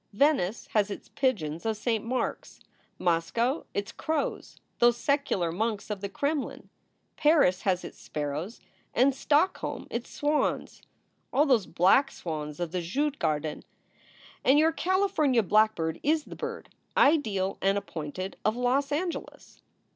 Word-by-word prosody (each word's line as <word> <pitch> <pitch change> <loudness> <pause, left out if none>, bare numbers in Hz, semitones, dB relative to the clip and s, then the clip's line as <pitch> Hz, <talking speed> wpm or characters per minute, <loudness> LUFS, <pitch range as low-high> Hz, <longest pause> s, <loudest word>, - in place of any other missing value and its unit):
Venice 230 -5 +2
has 210 -2 +3
its 200 - -7
pigeons 170 - -1
of 220 -1 -1
Saint 220 0 -1
Mark 255 +2 -1
s; - - -17 0.4
Moscow 230 - 0
its 200 0 -2
crows, 315 -2 -3 0.2
those 240 0 +5
secular 240 - 0
monks 215 +3 -2
of 205 -2 -4
the 200 - -3
Kremlin; 285 +7 -3 0.5
Paris 295 - +4
has 185 -2 0
its - - -9
sparrows, 150 +8 -4 0.4
and 265 +3 +4
Stockholm 300 +6 0
its 235 0 -4
swans 295 +1 -1 0.5
ah, 290 - +4
those 245 - +3
black 195 +12 +4
swans 150 - -6
of 175 -2 -2
the 180 -1 -1
Djugarden! 170 - -1 0.8
and 270 +3 +5
your 315 +2 +5
Cali 375 +4 +1
fornia 265 - +2
blackbird 210 -7 +2
is 310 +1 +2
the - - -10
bird, 465 0 -6 0.3
ideal 215 -11 +3
and 195 +1 +2
appointed, 185 -1 -5
of 215 +1 +2
Los 260 +3 +1
Angeles." 335 +4 -4
225 Hz, 140 wpm, -28 LUFS, 185-285 Hz, 0.8 s, those